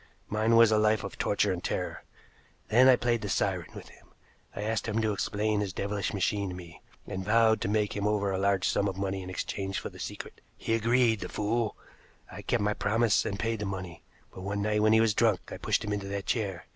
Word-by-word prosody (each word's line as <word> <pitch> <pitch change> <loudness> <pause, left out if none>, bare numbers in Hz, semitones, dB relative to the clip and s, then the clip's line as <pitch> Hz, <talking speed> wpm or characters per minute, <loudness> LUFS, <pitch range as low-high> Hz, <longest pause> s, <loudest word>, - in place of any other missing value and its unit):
Mine 110 +2 +2
was 115 -1 +7
a 110 - +4
life 110 0 +2
of 100 - -7
torture 100 -1 +1
and 90 -1 -6
terror. - - -3 0.7
Then 125 +4 +6
I 130 - +8
played 120 -1 0
the 100 - -4
siren 95 -2 -1
with - - -10
him. - - -19 0.5
I 105 - -4
asked 110 0 -1
him 110 0 0
to 110 -1 +1
explain 105 +1 -1
his 100 -3 -2
devilish 100 +1 -2
machine 100 0 -1
to 90 - -6
me, 85 -2 -11 0.2
and 95 - -5
vowed 110 +2 +3
to - - -1
make 105 0 0
over 100 -1 0
to - - -1
him 95 - -1
a - - -2
large 100 -2 +2
sum 100 - +1
of 95 -1 -3
money 95 -1 -2
in 90 - -8
exchange 95 +1 -3
for - - -5
the - - -13
secret. - - -7 0.2
He 115 - -2
agreed 115 0 +3
the - - -6
fool! 110 +1 -1 0.5
I - - -8
kept - - 0
my 105 0 +1
promise 110 +1 +2
and 100 - -3
paid 115 0 -2
the 105 - -3
money, 90 -4 -6 0.3
but - - -9
one 100 +1 -2
night 105 0 +1
when 110 0 +4
he 110 - +6
was 110 -2 +3
drunk, 110 -3 +1
I - - -5
pushed - - 0
him 105 - -2
into 100 -1 -3
that 100 0 -4
chair. 100 -7 -2
105 Hz, 240 wpm, -29 LUFS, 100-110 Hz, 0.7 s, I